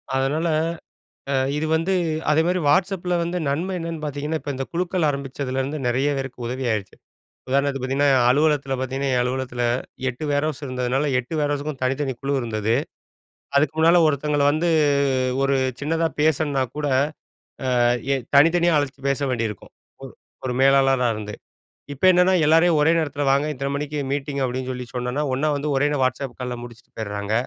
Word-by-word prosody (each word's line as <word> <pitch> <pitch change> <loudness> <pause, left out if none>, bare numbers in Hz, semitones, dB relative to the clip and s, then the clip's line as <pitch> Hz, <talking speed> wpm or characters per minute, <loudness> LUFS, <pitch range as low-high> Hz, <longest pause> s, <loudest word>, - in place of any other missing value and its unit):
அதனால 140 +5 0 0.9
அ - - +1 0.2
இது 155 +1 -1
வந்து 165 +4 +1 0.4
அதே 155 +1 +4
மாரி 180 +1 +1
WhatsAppல 180 +4 +1
வந்து 170 +1 -2
நன்மை 170 +7 -1
என்னென்னு 165 -1 -5
பாத்தீங்கன்னா, 150 +2 -3
இப்ப 145 - -6
இந்த 135 +1 -3
குழுக்கள் 175 -1 0
ஆரம்பிச்சதுலேருந்து 135 0 -3
நெறைய 130 +4 +1
பேருக்கு 130 -2 -5
உதவி 130 +2 -4
ஆயிடுச்சு. 105 -3 -3 0.5
உதாரணத்துக்கு 140 0 0
பாத்தீங்கன்னா, 140 +2 +2 0.2
அலுவலகத்தில 145 0 +2
பாத்தீங்கன்னா, 135 +1 -2
என் 125 - +2
அலுவலகத்தில 125 -1 -2 0.5
8 125 +5 -7
வேர்ஹவுஸ் 145 0 -1
இருந்ததுனால 130 +2 -1
8 125 +6 -7
வேர்ஹவுஸ்க்கும் 145 -1 -2
தனித்தனி 135 +1 0
குழு 140 0 -1
இருந்தது 110 -1 -1 0.8
அதுக்கு 150 +2 +2
முன்னால 165 +2 +5
ஒருத்தவங்கள 145 0 +1
வந்து 160 +4 +1 0.7
ஒரு 135 0 +2 0.3
சின்னதா 165 +3 0
பேசுணுன்னா 150 -3 +2
கூட, 150 - -2 1.3
அ - - +2 0.2
தனித்தனியா 170 +3 +5
அழைச்சு 145 -1 -4
பேச 140 - 0
வேண்டியிருக்கும் 115 -5 -4 0.7
ஒரு 125 - -1
மேலாளரா 135 -2 +4
இருந்து. 105 -1 -6 0.6
இப்போ 140 +6 -1
என்னன்னா 180 +1 +4
எல்லாரையும் 165 +2 +4
ஒரே 155 +2 +4
நேரத்தில 145 -3 -1
வாங்க 140 +2 +2
இத்தன 140 0 -3
மணிக்கு 150 +1 -3
மீட்டிங் 140 0 -2
அப்டின்னு 130 +1 -3
சொல்லி 125 -1 -5
சொன்னோம்னா, 125 +3 -2
ஒண்ணா 135 +4 0
வந்து 145 +1 -2
ஒரே 145 +2 +3
நேரம் 145 -3 +1
WhatsAppகால் 125 -2 -4
முடிச்சிட்டு 120 0 -13
போயிடுறாங்க. 105 -1 -3
140 Hz, 150 wpm, -22 LUFS, 130-155 Hz, 1.3 s, முன்னால